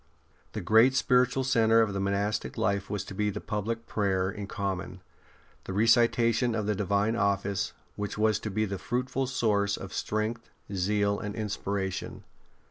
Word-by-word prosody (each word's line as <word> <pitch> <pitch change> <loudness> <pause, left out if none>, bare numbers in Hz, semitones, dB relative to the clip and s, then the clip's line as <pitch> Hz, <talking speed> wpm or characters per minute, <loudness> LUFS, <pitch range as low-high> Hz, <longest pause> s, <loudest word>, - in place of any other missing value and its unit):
The - - -3
great 115 +4 +5
spiritual 125 +1 +3
centre 115 -3 +4
of 105 -3 +1
monastic 100 +2 -1
life 100 -3 0
was 105 -1 -2
to 100 - -9
be 105 +2 0
the 100 - -4
public 115 +2 -3
prayer 95 -2 0
in 100 0 -6
common, 95 -2 -4 0.6
the 95 - -5
recitation 115 +2 +3
of 105 -2 -1
the 105 - +1
Divine 100 +3 +1
Office, 100 -2 0 0.2
which 105 0 -4
was 110 0 +2
to 105 - -4
be 110 +2 0
the 100 -2 -4
fruitful 125 +2 -2
source 105 -5 +1
of 95 - -8
strength, 110 +2 -2 0.2
zeal, 100 +2 +1
and 105 -2 -5
inspiration. 100 -3 -3
105 Hz, 155 wpm, -28 LUFS, 100-115 Hz, 0.6 s, great